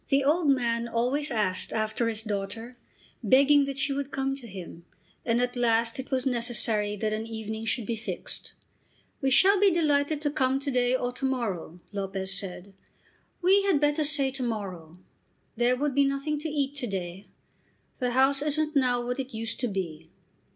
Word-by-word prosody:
The 275 Hz, 0 st, +3 dB
old 305 Hz, +2 st, +2 dB
man 235 Hz, -3 st, +1 dB
always 250 Hz, +6 st, 0 dB
asked 210 Hz, -7 st, 0 dB
after 220 Hz, +1 st, -1 dB
his 220 Hz, -1 st, -2 dB
daughter, 220 Hz, +3 st, -4 dB, 0.5 s
begging 280 Hz, +5 st, +5 dB
that 275 Hz, -1 st, -5 dB
she 275 Hz, +1 st, 0 dB
would 280 Hz, 0 st, -3 dB
come 270 Hz, -1 st, -1 dB
to 250 Hz, -4 st, -8 dB
him, 180 Hz, -4 st, -9 dB, 0.4 s
and 230 Hz, 0 st, +1 dB
at 245 Hz, 0 st, -1 dB
last 230 Hz, 0 st, +1 dB
it 265 Hz, -, -6 dB
was 260 Hz, -1 st, -1 dB
necessary 230 Hz, -4 st, +1 dB
that 215 Hz, +1 st, -2 dB
an 220 Hz, +1 st, -3 dB
evening 220 Hz, 0 st, -5 dB
should 225 Hz, 0 st, -1 dB
be 230 Hz, -, -2 dB
fixed. 225 Hz, -, -4 dB, 0.7 s
"We 270 Hz, -, +2 dB
shall 385 Hz, +9 st, +5 dB
be 405 Hz, 0 st, +6 dB
delighted 300 Hz, -3 st, +2 dB
to 290 Hz, -1 st, 0 dB
come 265 Hz, -1 st, +1 dB
to 280 Hz, 0 st, -2 dB
day 250 Hz, 0 st, +2 dB
or 245 Hz, -1 st, -1 dB
to 250 Hz, +2 st, -3 dB
morrow," 195 Hz, -10 st, -3 dB
Lopez 195 Hz, -1 st, -2 dB
said. 195 Hz, 0 st, -3 dB, 0.7 s
"We 385 Hz, +3 st, +5 dB
had 390 Hz, -7 st, +2 dB
better 295 Hz, +1 st, +2 dB
say 285 Hz, -2 st, +3 dB
to 270 Hz, 0 st, -6 dB
morrow. 190 Hz, -8 st, -5 dB, 0.6 s
There 240 Hz, +2 st, +2 dB
would 290 Hz, +1 st, -1 dB
be 280 Hz, +1 st, +4 dB
nothing 275 Hz, +2 st, -1 dB
to 315 Hz, +2 st, -4 dB
eat 285 Hz, -2 st, -1 dB
to 250 Hz, -, -2 dB
day. 190 Hz, -1 st, -5 dB, 0.7 s
The 250 Hz, -1 st, -1 dB
house 270 Hz, +2 st, +3 dB
isn't 300 Hz, +1 st, 0 dB
now 245 Hz, -3 st, +2 dB
what 245 Hz, +2 st, -3 dB
it 260 Hz, -3 st, -5 dB
used 225 Hz, +1 st, -4 dB
to 245 Hz, -, 0 dB
be." 165 Hz, -6 st, -5 dB
245 Hz, 185 wpm, -27 LUFS, 220-280 Hz, 0.7 s, be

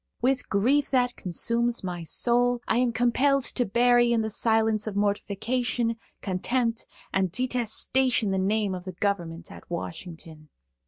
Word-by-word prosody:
With 255 Hz, +1 st, 0 dB
grief 260 Hz, +8 st, +2 dB
that 250 Hz, -2 st, +1 dB
consumes 235 Hz, +6 st, 0 dB
my 180 Hz, -2 st, -4 dB
soul, 245 Hz, +8 st, +1 dB
I 225 Hz, -, +2 dB
am 250 Hz, -1 st, +2 dB
compelled 255 Hz, +4 st, +2 dB
to 245 Hz, -, 0 dB
bury 240 Hz, +2 st, +4 dB
in 230 Hz, -1 st, +2 dB
the 220 Hz, 0 st, -2 dB
silence 220 Hz, -1 st, +1 dB
of 210 Hz, -, -4 dB
mortification, 230 Hz, +4 st, -1 dB, 0.3 s
contempt 230 Hz, +5 st, -1 dB, 0.3 s
and 190 Hz, -2 st, +1 dB
detestation 250 Hz, -1 st, 0 dB
the 190 Hz, -, 0 dB
name 205 Hz, +1 st, 0 dB
of 180 Hz, 0 st, -6 dB
the 185 Hz, -, -6 dB
government 175 Hz, -3 st, -3 dB
at -, -, -13 dB
Washington. 165 Hz, -2 st, -7 dB
225 Hz, 145 wpm, -26 LUFS, 195-245 Hz, 0.3 s, bury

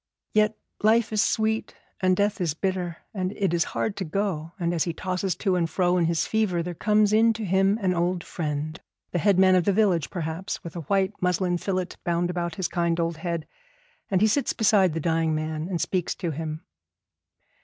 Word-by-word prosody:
Yet 215 Hz, 0 st, +3 dB, 0.2 s
life 220 Hz, +1 st, +3 dB
is 210 Hz, -, +3 dB
sweet 220 Hz, 0 st, 0 dB, 0.2 s
and 185 Hz, -1 st, +2 dB
death 205 Hz, -1 st, +1 dB
is 160 Hz, -4 st, 0 dB
bitter, 180 Hz, -2 st, -2 dB, 0.2 s
and 185 Hz, -1 st, -2 dB
it 195 Hz, -5 st, 0 dB
is 170 Hz, 0 st, +2 dB
hard 215 Hz, -, -1 dB
to 195 Hz, -, -2 dB
go; 170 Hz, -2 st, -2 dB
and 170 Hz, -1 st, 0 dB
as 165 Hz, -, +1 dB
he 170 Hz, -, -2 dB
tosses 185 Hz, +1 st, -2 dB
to 190 Hz, 0 st, 0 dB
and 170 Hz, -2 st, +1 dB
fro 180 Hz, 0 st, +1 dB
in 170 Hz, -, +3 dB
his 165 Hz, 0 st, +1 dB
fever 205 Hz, -6 st, 0 dB
there 175 Hz, +1 st, -4 dB
comes 210 Hz, +3 st, +2 dB
in 225 Hz, +1 st, +5 dB
to 220 Hz, -1 st, -5 dB
him 195 Hz, +2 st, +3 dB
an 185 Hz, -4 st, +1 dB
old 175 Hz, 0 st, 0 dB
friend, 155 Hz, 0 st, -4 dB, 0.3 s
the 175 Hz, -, 0 dB
headman 190 Hz, +1 st, +5 dB
of 180 Hz, -2 st, +3 dB
the 200 Hz, -, +4 dB
village 185 Hz, -7 st, +2 dB
perhaps, 170 Hz, +2 st, -4 dB
with 170 Hz, -, -8 dB
a -, -, -3 dB
white 195 Hz, 0 st, +2 dB
muslin 180 Hz, 0 st, +1 dB
fillet 185 Hz, -2 st, -1 dB
bound 175 Hz, +1 st, 0 dB
about 170 Hz, -2 st, -3 dB
his 185 Hz, -, -1 dB
kind 170 Hz, -1 st, 0 dB
old 165 Hz, -1 st, -1 dB
head, 170 Hz, -1 st, -3 dB, 0.6 s
and 190 Hz, -1 st, +2 dB
he 215 Hz, -, +6 dB
sits 265 Hz, +6 st, +1 dB
beside 200 Hz, -6 st, +3 dB
the -, -, 0 dB
dying 160 Hz, -1 st, +1 dB
man 155 Hz, +1 st, -3 dB
and 180 Hz, -3 st, -2 dB
speaks 180 Hz, -1 st, -1 dB
to 175 Hz, -3 st, -3 dB
him. 155 Hz, +1 st, -5 dB
180 Hz, 205 wpm, -25 LUFS, 170-200 Hz, 0.6 s, he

